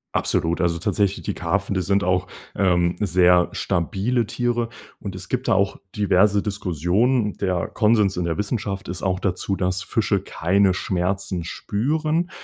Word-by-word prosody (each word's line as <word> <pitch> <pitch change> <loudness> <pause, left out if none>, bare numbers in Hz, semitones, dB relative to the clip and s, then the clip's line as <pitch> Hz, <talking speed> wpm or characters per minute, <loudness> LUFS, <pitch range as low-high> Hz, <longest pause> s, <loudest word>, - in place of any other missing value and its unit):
Absolut. 85 +1 +1
Also 85 -1 +1
tatsächlich 100 +3 0
die - - -1
Karpfen, - - -1
die 95 - 0
sind 100 +1 +1
auch, 90 0 +1 0.3
ähm, 90 -2 +2
sehr 90 -2 +4
stabile 105 +8 0
Tiere 120 +1 -1 0.3
und 100 -2 -5
es 95 0 -8
gibt 130 +4 -2
da - - +4
auch 100 0 +1 0.2
diverse 100 0 +3
Diskussionen. 105 - 0
Der 90 -4 -1
Konsens 105 -3 +2
in 90 - -1
der 85 -1 -2
Wissenschaft 100 -2 -3
ist 90 0 -5
auch 95 -2 0
dazu, 95 +1 -1
dass 90 0 -1
Fische - - 0
keine 95 +3 +2
Schmerzen 90 0 -2
spüren, 155 - -1
95 Hz, 155 wpm, -22 LUFS, 90-105 Hz, 0.3 s, sehr